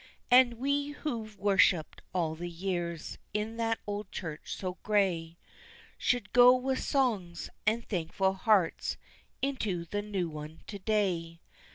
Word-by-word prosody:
"And 250 -1 +7
we 280 +4 0
who've 225 -8 -3
worshipped 195 -4 +3
all 165 -4 0
the 175 +2 -5
years 170 -2 -3 0.2
in 215 +2 -2
that 225 -1 +1
old 205 -1 -4
church 160 -4 -5
so 185 -1 -5
gray, 175 -6 +1 0.6
Should 245 -4 0
go 245 +1 +8
with 260 +1 -1
songs, 215 - 0 0.2
and 230 +2 +1
thankful 190 +1 0
hearts, 195 -2 +2 0.5
into 215 -11 -1
the 205 +4 -2
new 165 -7 -4
to 200 - -7
day. 185 -5 0
200 Hz, 130 wpm, -30 LUFS, 170-230 Hz, 0.6 s, go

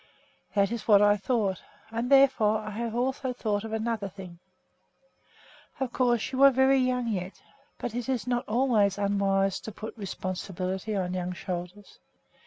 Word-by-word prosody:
"That 200 0 +3
is 235 -2 -5
what 205 -3 +7
I 205 0 +5
thought, 205 -3 -1 0.3
and 230 +2 -2
therefore 260 -6 +5
I 215 0 -6
have 230 +2 -4
also 260 +1 -1
thought 210 -4 -2
of 225 - -6
another 220 -2 -2
thing. 180 -3 -11 1.4
Of 265 -3 -2
course 240 -3 +1
you 260 0 -1
are 275 - +10
very 265 +1 +4
young 250 -1 0
yet, 190 -4 -4 0.4
but 235 - -5
it 245 +2 -4
is 255 -3 -1
not 245 0 -1
always 215 -4 +2
unwise 195 -1 +1
to 220 - -8
put 215 +2 -8
responsibility 190 0 -4
on 180 -2 -1
young 180 0 -3
shoulders. 180 +3 -7
215 Hz, 160 wpm, -28 LUFS, 195-245 Hz, 1.4 s, are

